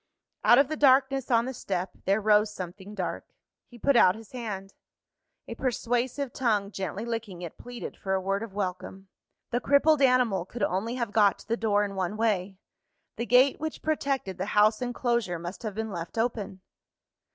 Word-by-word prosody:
Out 240 - +7
of 275 0 +5
the 310 - -3
darkness 270 -2 +3
on 235 -1 +3
the 260 - -4
step, 190 -5 -3
there 195 +3 +2
rose 210 0 +3
something 190 +1 -8
dark. 185 -3 -4 0.4
He 240 - -14
put 280 +4 +2
out 185 -6 +6
his 220 -1 -13
hand. 205 -6 -6 0.7
A - - -5
persuasive 250 +1 -1
tongue, 210 -5 0
gently 195 +2 -4
licking 225 -6 -5
it, 170 - -7
pleaded 245 -1 -7
for 190 -1 -2
a - - +1
word 195 +1 -1
of 225 -2 -6
welcome. 190 0 -5 0.4
The 245 - +1
crippled 285 +2 +4
animal 250 -8 +3
could 210 +4 -6
only 200 +6 -1
have 235 -4 -2
got 205 -2 +4
to - - -16
the 230 - +1
door 210 -3 +1
in 200 - -6
one 190 +2 -2
way; 200 -4 0 0.6
the 235 - -3
gate 255 +2 +5
which 315 0 -5
protected 275 - -1
the 190 - -2
house 215 +3 +5
enclosure 240 -6 -1
must 175 +3 -7
have 215 -4 -5
been 220 0 -3
left 170 +3 -6
open. 225 -5 -2
220 Hz, 185 wpm, -27 LUFS, 195-245 Hz, 0.7 s, Out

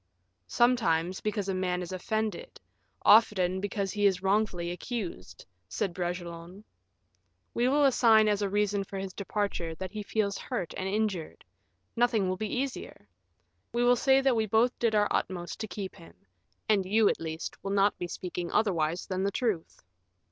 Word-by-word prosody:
"Sometimes, 185 -8 +2
because 210 -2 -2
a 195 - 0
man 180 -1 -1
is 175 - -7
offended; 220 - -3 0.4
often 190 -4 +5
because 200 -1 -2
he 205 -1 +3
is 190 -1 0
wrongfully 190 -3 +1
accused," 180 - -6 0.2
said 170 - -2
Bragelonne. 175 +1 -5 0.9
"We 240 +1 +1
will 285 +2 +4
assign 225 -5 +5
as 210 -1 +1
a 200 - 0
reason 205 0 +1
for 195 0 -8
his 190 -1 -5
departure, 200 -5 -3
that 185 +2 -6
he 215 - -5
feels 200 -1 -1
hurt 210 - -4
and 190 0 -3
injured 200 -5 -2 0.5
nothing 230 -5 +2
will 185 - 0
be 215 +2 -3
easier; 260 - -4 0.7
we 240 +1 +1
will 245 0 +5
say 265 +2 +4
that 265 -2 +3
we 220 -1 +1
both 225 +4 +3
did 230 -2 +1
our 205 0 +4
utmost 175 -2 -2
to 220 - -4
keep 190 0 -6
him, 170 -4 -15 0.5
and 205 -3 +3
you, 210 +3 +3
at - - +1
least, 160 0 -6
will 195 - -3
not 200 0 +3
be 175 - -3
speaking 175 -1 -5
otherwise 175 -5 +1
than 185 0 -3
the 195 - +1
truth. 210 -7 -2
200 Hz, 170 wpm, -29 LUFS, 180-220 Hz, 0.9 s, often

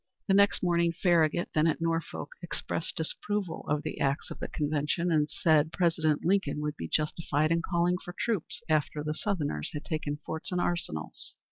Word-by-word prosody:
The 195 - +3
next 200 0 +4
morning, 170 -1 +3
Farragut, 170 -1 +2
then 155 +1 +4
at 160 - +1
Norfolk, 165 0 -2
expressed - - -3
disapproval 210 - -3
of 150 0 +1
the - - -4
acts 140 +1 0
of - - -7
the - - -3
convention, 150 +3 0
and 150 -1 +3
said 155 -1 +3
President 160 -4 +1
Lincoln 180 -6 +2
would 150 0 -2
be 80 - -5
justified 155 0 +1
in 165 0 +3
calling 175 +1 +1
for 175 - -8
troops 220 -9 -1
after 150 -1 +1
the 150 0 -1
Southerners 155 - -2
had 150 - -5
taken 150 -2 -2
forts 160 +3 -4
and 180 - 0
arsenals. 170 - -3
160 Hz, 175 wpm, -29 LUFS, 150-175 Hz, -, next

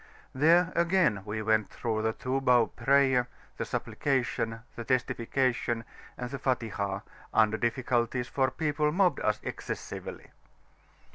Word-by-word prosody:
There 165 +5 +4
again 170 - +3
we 110 +1 -3
went 110 -1 +2
through 110 -2 -2
the 110 0 +1
two 130 +3 -2
bow 125 -3 +5
prayer, 135 -2 +2 0.3
the - - -2
Supplication, 120 -4 -1
the 120 - -5
Testification, 120 -1 0 0.3
and 125 - -4
the 140 - -4
Fatihah, 105 -6 -1 0.3
under 110 -1 +3
difficulties, 120 0 0
for 130 +1 +1
people 150 +2 0
mobbed 180 +2 +2
us 105 0 0
excessively. - - -6
125 Hz, 125 wpm, -29 LUFS, 115-140 Hz, 0.3 s, bow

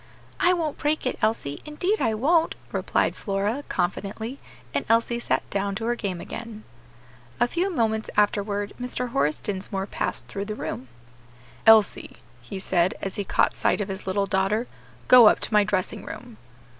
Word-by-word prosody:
"I 355 - +4
won't 320 -4 -2
break 300 0 0
it, 255 - -2
Elsie, 215 -10 -1
indeed 360 +8 -1
I 220 -1 +1
won't," 320 +8 +2 0.2
replied - - 0
Flora, 205 +6 -2
confidently; 205 +7 -3 0.3
and - - 0
Elsie 230 +1 +2
sat - - -1
down 200 0 -1
to 225 +2 -3
her 240 - +1
game 195 -7 -3
again. 225 +2 -8 0.8
A 240 - +4
few 350 +9 0
moments 220 -7 0
afterward 205 0 +1
Mr. 250 0 -2
Horace 150 -7 +1
Dinsmore 195 -1 -3
passed - - -2
through 200 0 -4
the 215 0 -4
room. 130 - -5 0.8
"Elsie," 220 -3 +5 0.2
he 120 +11 -7
said, 185 -1 +1
as 195 - -5
he 205 - -1
caught - - +2
sight - - +1
of 205 -1 -2
his 190 0 -6
little 200 +1 +1
daughter, 195 +4 +1 0.4
"go 245 -3 +9
up - - +5
to - - -1
my 210 -1 +6
dressing 195 -3 -1
room." - - -9
210 Hz, 170 wpm, -25 LUFS, 195-240 Hz, 0.8 s, go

